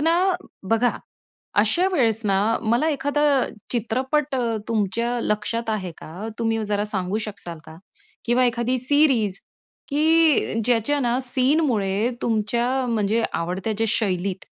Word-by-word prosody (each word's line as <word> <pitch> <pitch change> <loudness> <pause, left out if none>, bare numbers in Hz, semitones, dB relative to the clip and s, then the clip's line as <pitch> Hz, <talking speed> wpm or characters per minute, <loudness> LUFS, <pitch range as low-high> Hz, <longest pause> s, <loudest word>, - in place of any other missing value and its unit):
ना 325 +3 +3 0.6
बघा. 235 +2 +2 0.6
अशा 360 +2 +2
वेळेस 230 - +2
ना, 195 -1 +2 0.3
मला 245 +7 +2
एखादा 290 -1 0 0.5
चित्रपट 265 +5 -1
अ, 255 - 0 0.3
तुमच्या 230 +3 0
लक्षात 220 +2 -1
आहे 190 -5 -2
का? 185 +8 -8
तुम्ही 225 -1 0
जरा 205 0 -1
सांगू 195 0 -2
शकाल 175 -5 -6
का? 160 - -12 0.5
किंवा 245 +2 +3
एखादी 245 +1 0
सीरीज 250 -7 +2 0.5
की 310 -5 +3
ज्याच्या 245 +4 +2
ना 245 -1 +1
सीनमुळे 250 -6 +1
तुमच्या 230 +1 0 0.2
म्हणजे 225 -1 +1
आवडत्या 180 +5 -2
ज्या 225 +2 -1
शैलीत. 190 -2 -1
230 Hz, 125 wpm, -23 LUFS, 210-260 Hz, 0.6 s, ना